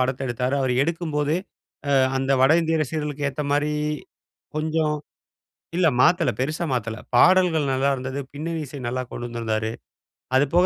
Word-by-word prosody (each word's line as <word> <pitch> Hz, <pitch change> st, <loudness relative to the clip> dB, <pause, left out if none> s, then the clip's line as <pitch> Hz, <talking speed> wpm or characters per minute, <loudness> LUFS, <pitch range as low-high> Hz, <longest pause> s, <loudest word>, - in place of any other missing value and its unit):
படத்த 130 Hz, 0 st, 0 dB
எடுத்தாரு. 125 Hz, +2 st, -1 dB
அவர் 130 Hz, -2 st, +1 dB
எடுக்கும்போதே, 155 Hz, -1 st, 0 dB, 0.6 s
அ -, -, +6 dB, 0.2 s
அந்த 135 Hz, +1 st, 0 dB
வட 135 Hz, +3 st, +6 dB
இந்திய 165 Hz, 0 st, +1 dB
ரசிகர்களுக்கு 150 Hz, -1 st, -2 dB
ஏத்தமாரி 145 Hz, +2 st, 0 dB, 0.8 s
கொஞ்சம் 155 Hz, 0 st, 0 dB, 0.8 s
இல்ல 180 Hz, -1 st, +3 dB
மாத்தல 170 Hz, -1 st, +4 dB
பெருசா 155 Hz, +6 st, -1 dB
மாத்தல. 115 Hz, -3 st, -2 dB, 0.2 s
பாடல்கள் 170 Hz, +1 st, +5 dB
நல்லாயிருந்தது. 135 Hz, 0 st, 0 dB
பின்னணி 160 Hz, +3 st, -3 dB
இசை 140 Hz, +2 st, -8 dB
நல்லா 130 Hz, +2 st, -1 dB
கொண்டு 120 Hz, -, -5 dB
வந்திருந்தாரு. 110 Hz, -2 st, -2 dB, 0.7 s
அது 135 Hz, +2 st, +5 dB
போக 175 Hz, +1 st, +5 dB
145 Hz, 135 wpm, -24 LUFS, 130-160 Hz, 0.8 s, அ